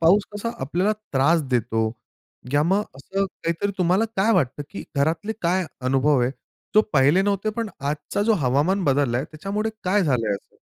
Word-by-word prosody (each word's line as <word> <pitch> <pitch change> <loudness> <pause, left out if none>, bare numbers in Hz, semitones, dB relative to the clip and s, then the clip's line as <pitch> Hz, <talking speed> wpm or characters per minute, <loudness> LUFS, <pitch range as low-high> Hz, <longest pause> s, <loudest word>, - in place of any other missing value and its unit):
पाऊस 180 +5 +5
कसा 210 +3 -3
आपल्याला 175 +10 +1 0.2
त्रास 155 +5 +3
देतो, 115 -2 +1 0.7
या 145 +1 +4
मग 195 +5 +2
असं 195 +8 -2
काहीतरी 180 +2 -3
तुम्हाला 185 +4 +3
काय 205 +4 +3
वाटतं, 145 -4 0
की 200 - -7
घरातले 160 +9 0
काय 180 +2 +2 0.2
अनुभव 135 +1 +3
आहे? 120 - +1 0.4
तो 215 - +7
पहिले 145 +7 +4
नव्हते 200 +1 0
पण 230 -2 -2
आजचा 150 +8 -2
जो 225 +2 +3
हवामान 150 +10 +2
बदललाय 135 -3 +1
त्याच्यामुळे 200 +8 -3
काय 195 +3 +3
झालंय 125 -8 +1
असं? 100 - -11
170 Hz, 165 wpm, -23 LUFS, 140-200 Hz, 0.7 s, तो